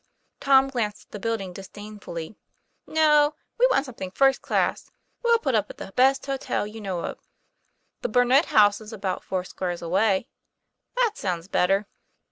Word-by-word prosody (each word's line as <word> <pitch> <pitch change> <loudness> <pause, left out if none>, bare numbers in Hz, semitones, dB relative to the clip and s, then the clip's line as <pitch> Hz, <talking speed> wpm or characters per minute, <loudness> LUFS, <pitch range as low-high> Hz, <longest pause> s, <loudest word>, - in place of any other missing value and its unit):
Tom 270 -1 +5
glanced 230 -6 -3
at - - -46
the 210 - -7
building 205 -4 -3
disdainfully. 200 -2 -8 0.5
'No; 300 -1 +4 0.2
we - - +6
want 295 - +2
something 225 -8 -7
first 270 +7 +3
class. - - -1 0.3
We'll 470 -1 +4
put 275 - -1
up 210 -2 +1
at - - -10
the 195 - -9
best 265 +2 +3
hotel 270 -6 -2
you 215 +1 -9
know 190 -4 -3
of." - - -6 0.8
"The - - -2
Burnet 250 +6 +4
House 205 0 +4
is 215 +1 -10
about 195 -4 -3
foursquares 180 -1 -4
away." 190 +5 +1 0.7
"That 480 -4 +1
sounds 175 -3 -3
better." 195 +2 +2
215 Hz, 155 wpm, -25 LUFS, 195-270 Hz, 0.8 s, we